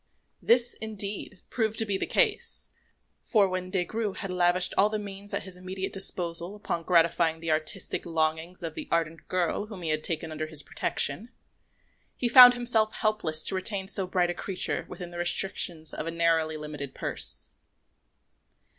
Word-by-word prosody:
This, 240 Hz, +1 st, +3 dB
indeed, 205 Hz, -3 st, -5 dB
proved 220 Hz, -2 st, -1 dB
to 225 Hz, -, +2 dB
be 200 Hz, -2 st, -1 dB
the -, -, -2 dB
case; -, -, +1 dB, 0.5 s
for 210 Hz, -5 st, +3 dB
when 185 Hz, 0 st, -4 dB
Des 185 Hz, -2 st, -1 dB
Grieux 220 Hz, -1 st, -3 dB
had 195 Hz, -1 st, -6 dB
lavished 180 Hz, 0 st, +2 dB
all 205 Hz, +2 st, +4 dB
the 215 Hz, -, -2 dB
means 200 Hz, -1 st, -7 dB
at -, -, -2 dB
his 190 Hz, -2 st, -6 dB
immediate 185 Hz, +1 st, -5 dB
disposal 180 Hz, -1 st, -2 dB
upon 185 Hz, -5 st, -3 dB
gratifying 165 Hz, -1 st, +3 dB
the 165 Hz, -1 st, -2 dB
artistic 155 Hz, 0 st, -1 dB
longings 160 Hz, +1 st, -2 dB
of 165 Hz, -2 st, -4 dB
the -, -, -7 dB
ardent 165 Hz, -1 st, -1 dB
girl 185 Hz, +3 st, -1 dB
whom 200 Hz, -5 st, -9 dB
he 160 Hz, -, -2 dB
had 155 Hz, 0 st, 0 dB
taken 165 Hz, -1 st, -3 dB
under 155 Hz, 0 st, -4 dB
his 155 Hz, -2 st, -3 dB
protection, 180 Hz, -, -2 dB, 0.9 s
he 245 Hz, -, 0 dB
found 245 Hz, +1 st, +10 dB
himself 235 Hz, -3 st, +1 dB
helpless 215 Hz, -8 st, +2 dB
to -, -, +4 dB
retain 190 Hz, +1 st, -2 dB
so 190 Hz, -1 st, +4 dB
bright 180 Hz, -1 st, +1 dB
a -, -, -3 dB
creature 185 Hz, +1 st, -1 dB
within 175 Hz, -2 st, -8 dB
the 175 Hz, -, -7 dB
restrictions 175 Hz, -2 st, +2 dB
of 155 Hz, -, -5 dB
a -, -, -2 dB
narrowly 165 Hz, -2 st, +1 dB
limited 150 Hz, -3 st, -7 dB
purse. -, -, -3 dB
180 Hz, 170 wpm, -27 LUFS, 165-205 Hz, 0.9 s, found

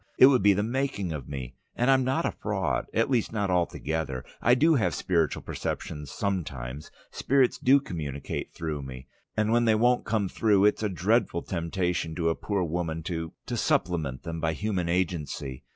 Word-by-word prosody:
It -, -, +9 dB
would 130 Hz, -2 st, +5 dB
be 100 Hz, 0 st, +6 dB
the 100 Hz, +2 st, 0 dB
making 120 Hz, -6 st, -1 dB
of 75 Hz, -4 st, -6 dB
me! 65 Hz, -3 st, -6 dB, 0.2 s
And 125 Hz, +3 st, +3 dB
I'm 130 Hz, -1 st, +4 dB
not 130 Hz, +1 st, 0 dB
a -, -, +1 dB
fraud, -, -, -2 dB
at 115 Hz, -, +2 dB
least 125 Hz, -5 st, +1 dB
not 100 Hz, -4 st, -1 dB
altogether. 80 Hz, -6 st, -1 dB, 0.2 s
I 120 Hz, +3 st, +5 dB
do 160 Hz, +6 st, +4 dB
have 125 Hz, -7 st, +1 dB
spiritual 85 Hz, -4 st, 0 dB
perceptions 75 Hz, -2 st, -4 dB
sometimes; 75 Hz, -8 st, -4 dB, 0.2 s
spirits 135 Hz, -2 st, +2 dB
do 135 Hz, +2 st, +5 dB
communicate 75 Hz, -, -5 dB
through 80 Hz, -3 st, -4 dB
me. 65 Hz, -1 st, -8 dB, 0.3 s
And 110 Hz, 0 st, +2 dB
when 120 Hz, 0 st, +3 dB
they 110 Hz, -1 st, +4 dB
won't 120 Hz, +3 st, +3 dB
come 110 Hz, -3 st, 0 dB
through 100 Hz, 0 st, +3 dB
it's 105 Hz, -, +3 dB
a 105 Hz, -, 0 dB
dreadful 95 Hz, -1 st, +1 dB
temptation 85 Hz, -1 st, -2 dB
to 80 Hz, 0 st, +1 dB
a 80 Hz, -, 0 dB
poor 100 Hz, -3 st, -1 dB
woman 80 Hz, -1 st, -2 dB
to 80 Hz, -1 st, -4 dB
to -, -, -3 dB
supplement 75 Hz, -7 st, 0 dB
them 85 Hz, 0 st, -5 dB
by 80 Hz, -1 st, +1 dB
human 90 Hz, -1 st, -2 dB
agency. 80 Hz, -7 st, -2 dB
90 Hz, 185 wpm, -27 LUFS, 80-110 Hz, 0.3 s, It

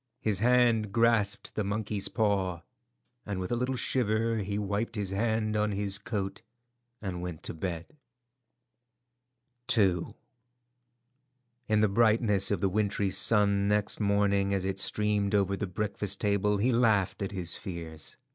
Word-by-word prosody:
His 105 Hz, -4 st, 0 dB
hand 120 Hz, -2 st, +3 dB
grasped 115 Hz, -3 st, +1 dB
the 105 Hz, -, -1 dB
monkey's 105 Hz, 0 st, -2 dB
paw, 95 Hz, -6 st, 0 dB, 0.6 s
and 100 Hz, -2 st, -4 dB
with 90 Hz, +3 st, -4 dB
a -, -, +2 dB
little 125 Hz, +2 st, -1 dB
shiver 115 Hz, -2 st, 0 dB
he 100 Hz, -1 st, -2 dB
wiped 105 Hz, +3 st, -2 dB
his 100 Hz, -3 st, -2 dB
hand 110 Hz, +1 st, 0 dB
on 105 Hz, 0 st, +1 dB
his 100 Hz, 0 st, -1 dB
coat 100 Hz, -2 st, -4 dB, 0.6 s
and 90 Hz, -3 st, -4 dB
went 90 Hz, -3 st, -6 dB
up -, -, -39 dB
to -, -, -4 dB
bed. 85 Hz, -, -5 dB, 1.8 s
II. 95 Hz, -5 st, +1 dB, 1.5 s
In 110 Hz, -1 st, +2 dB
the 110 Hz, -, +4 dB
brightness 110 Hz, -1 st, +2 dB
of 100 Hz, -4 st, -1 dB
the 95 Hz, -, +2 dB
wintry 100 Hz, 0 st, 0 dB
sun 100 Hz, -2 st, +2 dB
next 105 Hz, 0 st, +1 dB
morning 100 Hz, -1 st, +2 dB
as 95 Hz, -1 st, -2 dB
it 95 Hz, 0 st, -2 dB
streamed 105 Hz, 0 st, +1 dB
over 100 Hz, -1 st, +2 dB
the 100 Hz, +2 st, -3 dB
breakfast 100 Hz, +1 st, -3 dB
table 105 Hz, 0 st, +1 dB
he 120 Hz, +6 st, +2 dB
laughed 110 Hz, -6 st, +2 dB
at 100 Hz, -, -2 dB
his 90 Hz, -4 st, -4 dB
fears. 80 Hz, -5 st, -8 dB
100 Hz, 145 wpm, -29 LUFS, 95-110 Hz, 1.8 s, the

